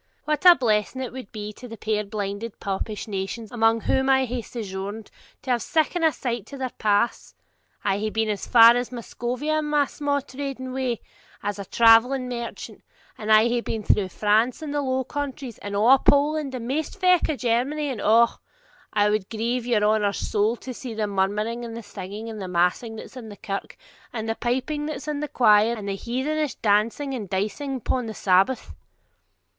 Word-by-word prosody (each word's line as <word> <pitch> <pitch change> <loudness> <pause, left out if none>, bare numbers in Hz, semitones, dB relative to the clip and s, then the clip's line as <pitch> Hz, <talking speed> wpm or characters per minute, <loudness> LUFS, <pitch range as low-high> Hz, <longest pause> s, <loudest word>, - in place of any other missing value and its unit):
'What 305 +4 +2
a 350 - +11
blessing 220 -1 0
it 250 - -6
would 255 -5 -8
be 210 -1 -6
to 250 - -11
the 225 -1 -9
puir 215 0 -1
blinded 205 +1 -5
popish 200 +2 -4
nations 205 +2 -4
among 225 -1 +2
whom 265 +4 +1
I 265 0 +4
hae 245 0 -3
sojourned, 205 -1 -6 0.3
to 260 - -2
have 240 -1 +2
siccan 325 - 0
a 320 - +5
light 235 -4 -2
to 280 - -9
their 260 -2 -3
paths! 205 - +1 0.5
I 200 0 +1
hae 215 +1 -1
been 220 +1 0
as 205 -2 -3
far 235 -1 +8
as 245 +1 -2
Muscovia 250 +5 -2
in 305 - -2
my 295 -1 +2
sma' 285 0 -1
trading 260 -1 -5
way, 255 -3 -2 0.4
as 205 0 -3
a 200 - -5
travelling 235 +5 +5
merchant, 235 -1 -6 0.3
and 215 0 -3
I 215 0 +7
hae 240 0 0
been 220 -2 -4
through 200 -1 +2
France, 220 - +1
and 295 -2 -4
the 290 - 0
Low 260 -1 0
Countries, 275 -3 -5
and 205 0 -5
a' 240 +6 +6
Poland, 285 0 +2
and 235 -2 -5
maist 300 +8 -2
feck 365 -2 +4
o' 310 - 0
Germany, 265 +5 0
and 240 - -5
O! 230 +2 +6 0.7
it 205 0 +4
would 210 -2 -1
grieve 235 +2 -2
your 225 -4 +2
honour's 210 -1 +2
soul 215 +2 0
to 255 +1 -8
see 240 -2 -7
the 215 -1 0
murmuring 210 +4 -1
and 230 -1 -6
the 230 - -7
singing 205 +2 -7
and 220 -2 -6
massing 180 +6 +1
that's 220 - -10
in 230 -3 -8
the 205 - -10
kirk, 195 -1 -5 0.3
and 225 -2 -4
the 225 - 0
piping 260 +6 -2
that's 300 -1 -6
in 300 -1 -2
the 300 - -2
quire, 220 -3 +4
and 210 -3 -7
the 195 - -1
heathenish 265 +8 -2
dancing 225 +7 +1
and 215 -7 -5
dicing 215 +9 -2
upon 250 -1 -2
the 220 - -6
Sabbath!' 195 +7 +2
235 Hz, 195 wpm, -24 LUFS, 210-265 Hz, 0.7 s, a